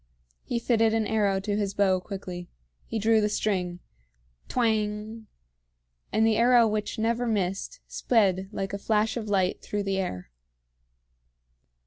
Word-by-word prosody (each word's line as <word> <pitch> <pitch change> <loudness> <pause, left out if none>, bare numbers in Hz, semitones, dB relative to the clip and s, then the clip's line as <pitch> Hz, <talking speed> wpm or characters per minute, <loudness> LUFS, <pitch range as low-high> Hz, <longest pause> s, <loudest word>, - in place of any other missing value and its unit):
He 240 - -2
fitted 225 -1 +2
an 220 -1 +1
arrow 205 -3 +1
to 205 +1 -2
his 200 -2 -2
bow 190 -2 +3
quickly. 180 -2 -7 0.4
He 225 - -3
drew 220 +1 +3
the 210 - +1
string. 180 -4 -1 0.7
Twang! 220 -1 -1 0.8
And 220 +1 +3
the 225 -1 +3
arrow 240 0 +5
which 210 -1 -2
never 230 +2 0
missed 200 - -2
sped 195 -5 +1
like 195 -2 -4
a 200 - -3
flash 220 +1 +1
of 220 -3 -4
light 190 -2 +1
through 205 -1 -3
the 195 -1 -1
air. 90 - -4
210 Hz, 140 wpm, -27 LUFS, 195-225 Hz, 0.8 s, arrow